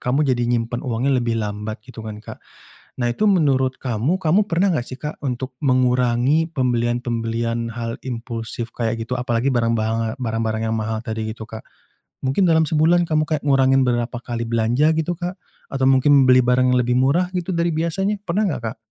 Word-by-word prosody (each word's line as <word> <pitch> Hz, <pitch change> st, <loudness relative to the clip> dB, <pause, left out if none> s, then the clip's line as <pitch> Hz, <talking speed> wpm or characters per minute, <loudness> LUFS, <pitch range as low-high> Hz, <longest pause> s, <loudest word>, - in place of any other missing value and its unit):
kamu 135 Hz, +5 st, +1 dB
jadi 120 Hz, -1 st, 0 dB
nyimpen 120 Hz, 0 st, -1 dB
uangnya 130 Hz, +2 st, -1 dB
lebih 115 Hz, -1 st, -1 dB
lambat 105 Hz, +1 st, -4 dB
gitu 125 Hz, -2 st, -10 dB
kan 110 Hz, -1 st, -6 dB
Kak. -, -, -10 dB, 0.6 s
Nah, 120 Hz, -, +1 dB
itu 215 Hz, -, -1 dB
menurut 140 Hz, -9 st, +2 dB
kamu, 130 Hz, -, -1 dB
kamu 185 Hz, +5 st, +3 dB
pernah 180 Hz, +3 st, +2 dB
enggak 120 Hz, -, -3 dB
sih 130 Hz, -, -6 dB
Kak 150 Hz, 0 st, -6 dB
untuk 130 Hz, 0 st, -4 dB
mengurangi 125 Hz, +4 st, +2 dB
pembelian-pemblian 120 Hz, -2 st, -1 dB
hal 115 Hz, +1 st, -4 dB
impulsif 115 Hz, -1 st, -5 dB
kayak, 115 Hz, -1 st, -1 dB
gitu? 125 Hz, +2 st, -3 dB
Apalagi 120 Hz, +1 st, 0 dB
barang 115 Hz, -2 st, +1 dB
banga 110 Hz, 0 st, -1 dB
barang-barang 110 Hz, -2 st, -2 dB
yang 110 Hz, -, 0 dB
mahal 110 Hz, 0 st, -2 dB
tadi 110 Hz, -1 st, -3 dB
gitu 110 Hz, 0 st, -9 dB
Kak. 110 Hz, 0 st, -9 dB, 0.6 s
Mungkin 135 Hz, +9 st, +2 dB
dalam 160 Hz, -1 st, +4 dB
sebulan 165 Hz, +2 st, +3 dB
kamu 155 Hz, -1 st, +2 dB
kayak 155 Hz, -2 st, -1 dB
ngurangin 135 Hz, -1 st, +4 dB
berapa 120 Hz, -1 st, -1 dB
kali 120 Hz, -2 st, -4 dB
belanja 120 Hz, +7 st, +2 dB
gitu, 160 Hz, +2 st, -1 dB
Kak? 180 Hz, +1 st, -3 dB, 0.4 s
Atau 135 Hz, -1 st, 0 dB
mungkin 135 Hz, +1 st, +5 dB
beli 125 Hz, -, +7 dB
barang 125 Hz, +1 st, +3 dB
yang -, -, +3 dB
lebih 125 Hz, 0 st, +1 dB
murah 145 Hz, +8 st, +2 dB
gitu 180 Hz, +1 st, -2 dB
dari 170 Hz, -1 st, +1 dB
biasanya? 180 Hz, +6 st, 0 dB
Pernah 195 Hz, +4 st, 0 dB
enggak, 145 Hz, -, -3 dB
Kak? -, -, -45 dB
125 Hz, 185 wpm, -21 LUFS, 115-150 Hz, 0.6 s, beli